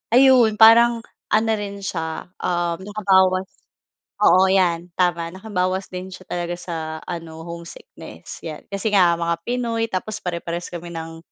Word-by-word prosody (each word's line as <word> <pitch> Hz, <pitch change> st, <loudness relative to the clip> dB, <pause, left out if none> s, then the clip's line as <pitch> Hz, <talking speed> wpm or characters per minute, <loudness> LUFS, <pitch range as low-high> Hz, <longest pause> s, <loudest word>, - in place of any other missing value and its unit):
ayun, 250 Hz, -4 st, +6 dB
parang 230 Hz, +1 st, +6 dB, 0.2 s
ano 220 Hz, +1 st, +2 dB
rin 200 Hz, -1 st, -6 dB
siya, 165 Hz, -1 st, -4 dB
uhm, 175 Hz, -1 st, -1 dB
nakabawas 190 Hz, -2 st, +2 dB, 0.7 s
oo 185 Hz, 0 st, +6 dB
'yan, 175 Hz, -2 st, +1 dB
tama. 170 Hz, -2 st, 0 dB
Nakabawas 190 Hz, -1 st, -2 dB
din 185 Hz, +1 st, -7 dB
siya 185 Hz, -, -11 dB
talaga 175 Hz, 0 st, -2 dB
sa 175 Hz, -1 st, -6 dB, 0.3 s
ano, 165 Hz, -2 st, -7 dB
homesickness, 170 Hz, -, -10 dB
'yan. 155 Hz, -2 st, -6 dB
Kasi 200 Hz, +2 st, -2 dB
nga 175 Hz, -3 st, +4 dB
mga 170 Hz, 0 st, 0 dB
Pinoy, 230 Hz, 0 st, -2 dB
tapos 215 Hz, +3 st, -4 dB
pare 175 Hz, -1 st, -2 dB
parehas 170 Hz, +1 st, -5 dB
kami 170 Hz, 0 st, -7 dB
ng 165 Hz, 0 st, -7 dB
185 Hz, 145 wpm, -22 LUFS, 170-205 Hz, 0.7 s, ayun